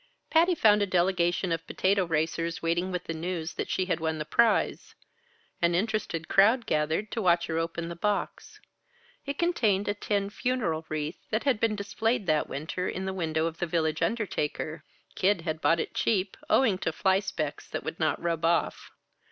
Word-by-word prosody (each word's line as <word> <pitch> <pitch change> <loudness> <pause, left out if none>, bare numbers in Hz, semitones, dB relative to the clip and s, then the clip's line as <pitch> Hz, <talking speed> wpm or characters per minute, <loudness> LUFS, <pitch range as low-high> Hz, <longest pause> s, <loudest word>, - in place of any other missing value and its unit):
Patty 340 +2 +4
found 210 -7 +5
a 205 - +1
delegation 180 -1 +1
of 165 0 -2
potato 195 0 +1
racers 165 +1 -1
waiting 170 +3 0
with 180 - -3
the 165 - -4
news 165 0 -4
that - - -4
she 185 - 0
had 180 - -1
won 160 0 -1
the 150 - -4
prize. 225 +8 +1 0.7
An 170 0 +3
interested 195 -5 -1
crowd 220 +5 +4
gathered 155 +7 0
to 230 - -2
watch 175 -3 +3
her 160 0 -1
open 165 0 -3
the 170 - -6
box; 205 +4 -2 0.7
it 280 0 -3
contained 220 - +1
a 205 - +1
tin 205 -1 -1
funeral 205 -11 -1
wreath 155 +1 -4
that 220 +1 0
had 270 -6 +2
been 220 -1 +1
displayed 210 +2 -1
that 155 -3 +1
winter 165 +6 -3
in 190 - -4
the 190 - -2
window 160 -3 -1
of 165 -1 -4
the 175 - -1
village 160 -1 0
undertaker 165 -6 -2 0.3
Kid 190 -1 +2
had 160 -1 -3
bought 165 - +3
it - - -3
cheap, 195 -3 0
owing 220 -8 +3
to 160 - -1
fly 190 +4 +2
specks 155 -7 -4
that - - -4
would 160 +1 -5
not 155 -1 +1
rub 170 -1 -2
off. 170 +1 0
175 Hz, 185 wpm, -28 LUFS, 165-205 Hz, 0.7 s, found